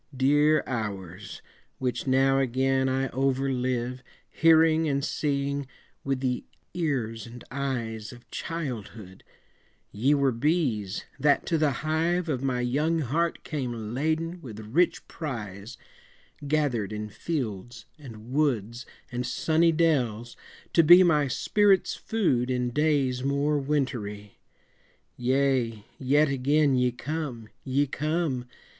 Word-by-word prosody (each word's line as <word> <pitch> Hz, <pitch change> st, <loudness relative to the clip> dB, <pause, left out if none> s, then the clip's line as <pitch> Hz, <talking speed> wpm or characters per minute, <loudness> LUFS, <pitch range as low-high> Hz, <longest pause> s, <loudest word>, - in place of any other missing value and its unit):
Dear 145 Hz, +3 st, +4 dB
hours! 100 Hz, -5 st, -5 dB, 0.3 s
which 130 Hz, +1 st, -2 dB
now 135 Hz, +1 st, +3 dB
again 130 Hz, +1 st, +1 dB
I 135 Hz, +1 st, 0 dB
over 135 Hz, +1 st, 0 dB
live, 125 Hz, 0 st, -2 dB, 0.3 s
Hearing 160 Hz, -1 st, +4 dB
and 140 Hz, 0 st, 0 dB
seeing 140 Hz, -2 st, -1 dB, 0.4 s
with 135 Hz, -1 st, -1 dB
the 125 Hz, -2 st, -1 dB, 0.3 s
ears 120 Hz, -, -2 dB
and 120 Hz, +1 st, -11 dB
eyes 115 Hz, -5 st, -3 dB
Of 120 Hz, -1 st, -15 dB
childhood, 115 Hz, -, -6 dB, 0.7 s
ye 130 Hz, +8 st, +2 dB
were 140 Hz, -2 st, +2 dB
bees, 120 Hz, -, 0 dB
that 145 Hz, +1 st, +3 dB
to 165 Hz, -, +1 dB
the 155 Hz, -1 st, +3 dB, 0.2 s
hive 165 Hz, +2 st, 0 dB
Of 130 Hz, -4 st, -1 dB
my 130 Hz, -2 st, 0 dB
young 150 Hz, +7 st, +1 dB
heart 160 Hz, +6 st, -1 dB
came 120 Hz, -7 st, -4 dB
laden 160 Hz, +5 st, -1 dB
with 110 Hz, -7 st, -9 dB
rich 140 Hz, +12 st, +1 dB
prize, 110 Hz, -, -6 dB, 0.7 s
Gathered 140 Hz, -9 st, 0 dB
in 105 Hz, 0 st, -4 dB
fields 115 Hz, -, -5 dB
and 115 Hz, -4 st, -11 dB
woods 125 Hz, -5 st, 0 dB, 0.2 s
and 125 Hz, 0 st, -2 dB
sunny 160 Hz, +6 st, +2 dB
dells, 125 Hz, -9 st, 0 dB, 0.4 s
to 165 Hz, -, +6 dB
be 175 Hz, +4 st, +8 dB
My 150 Hz, -5 st, +3 dB
spirit's 200 Hz, +7 st, +2 dB
food 135 Hz, -, 0 dB
in 125 Hz, -1 st, 0 dB
days 140 Hz, -3 st, +1 dB
more 140 Hz, +2 st, +1 dB
wintery. 125 Hz, -8 st, -3 dB, 0.8 s
Yea, 125 Hz, -4 st, 0 dB
yet 145 Hz, +3 st, +3 dB
again 140 Hz, +2 st, +2 dB
ye 125 Hz, -1 st, +2 dB
come! 130 Hz, -4 st, -5 dB
ye 140 Hz, +2 st, +1 dB
come! 150 Hz, -3 st, -2 dB
135 Hz, 120 wpm, -27 LUFS, 120-150 Hz, 0.8 s, be